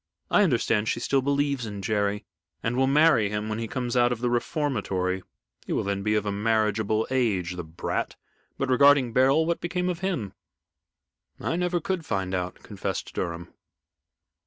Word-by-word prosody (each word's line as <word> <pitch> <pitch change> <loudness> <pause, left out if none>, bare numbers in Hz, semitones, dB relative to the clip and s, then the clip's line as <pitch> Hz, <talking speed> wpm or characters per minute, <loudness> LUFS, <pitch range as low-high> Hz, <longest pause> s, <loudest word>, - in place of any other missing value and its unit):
I - - +5
understand 115 - +2
she - - -1
still 135 +2 +1
believes 140 -2 0
in 100 -2 -6
Jerry 105 0 0 0.4
and 115 +1 0
will 130 +1 +3
marry 140 -7 +4
him 105 +1 -3
when 110 +1 -2
he 115 - -3
comes 125 0 -3
out 120 0 +4
of 125 - -1
the 120 0 0
reformatory. 100 - -1 0.5
He - - -1
will - - 0
then 100 0 -2
be 105 +1 +1
of 105 -1 0
a 100 - -1
marriageable 110 0 +1
age, 100 -9 0
the 90 - -5
brat! 80 +1 -3 0.4
But, 135 - -1
regarding 135 -2 +5
Beryl, 135 +6 +4
what 170 +1 -1
became 180 +1 -1
of 175 -2 -3
him?" 170 - -2 1.1
"I - - -1
never 180 0 0
could 180 +1 -2
find 95 -8 -2
out," 90 0 -2
confessed - - -4
Durham. 85 -1 -4
115 Hz, 175 wpm, -26 LUFS, 100-140 Hz, 1.1 s, I